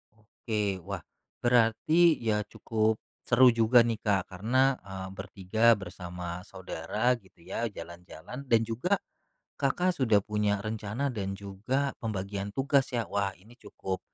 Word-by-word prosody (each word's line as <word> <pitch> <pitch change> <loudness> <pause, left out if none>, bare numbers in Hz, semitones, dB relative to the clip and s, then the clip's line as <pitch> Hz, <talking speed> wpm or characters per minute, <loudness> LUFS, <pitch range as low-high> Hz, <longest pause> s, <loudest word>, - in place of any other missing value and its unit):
Oke, 105 -2 -3
wah, - - -4 0.4
berarti 125 +8 +4
ya 105 -2 +1
cukup 110 0 0 0.3
seru 125 +1 +7
juga 115 +1 +5
nih 115 -2 -1
Kak 100 -3 0
karena, 130 +8 +2
eee, 95 -1 -7
ber-3 100 +4 +2
bersama 90 -2 -6
saudara 95 +6 -1
gitu 95 -4 -23
ya, 115 +6 -2
jalan-jalan 90 - -9
dan 115 -2 +4
juga 120 - 0 0.6
Kakak 180 +1 +2
sudah 115 -9 +4
punya 105 -1 0
rencana 110 +5 -2
dan 100 -4 -3
juga 105 +8 -2
pembagian 100 -3 -3
tugas 135 0 +2
ya. 115 - +1
Wah, 100 -1 0
ini 110 +6 -18
cukup 95 -1 -5
110 Hz, 130 wpm, -29 LUFS, 95-120 Hz, 0.6 s, seru